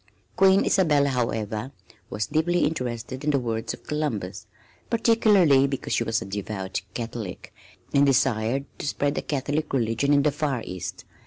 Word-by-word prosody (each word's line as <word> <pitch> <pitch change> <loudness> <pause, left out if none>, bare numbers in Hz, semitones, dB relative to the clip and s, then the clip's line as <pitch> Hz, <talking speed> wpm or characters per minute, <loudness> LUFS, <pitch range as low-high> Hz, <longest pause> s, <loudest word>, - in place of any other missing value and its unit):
Queen 195 0 +5
Isabella, 150 -7 +3
however, 115 -1 -2 0.4
was 105 +2 -2
deeply 165 +3 +1
interested 125 -3 -3
in 150 - 0
the 145 - +3
words 115 -3 -2
of - - -24
Columbus, 110 -10 -3 0.4
particularly 205 - +4
because 135 -1 -3
she - - +2
was 115 0 -1
a - - -10
devout 100 -1 -4
Catholic, 115 -5 -6 0.4
and 140 - +5
desired 130 -1 +2
to - - -4
spread 145 0 0
the - - -2
Catholic 145 +2 -2
religion 120 +2 +1
in 140 -1 +4
the 150 - +3
Far 140 -4 -2
East. 90 -1 -6
135 Hz, 155 wpm, -25 LUFS, 115-150 Hz, 0.4 s, Queen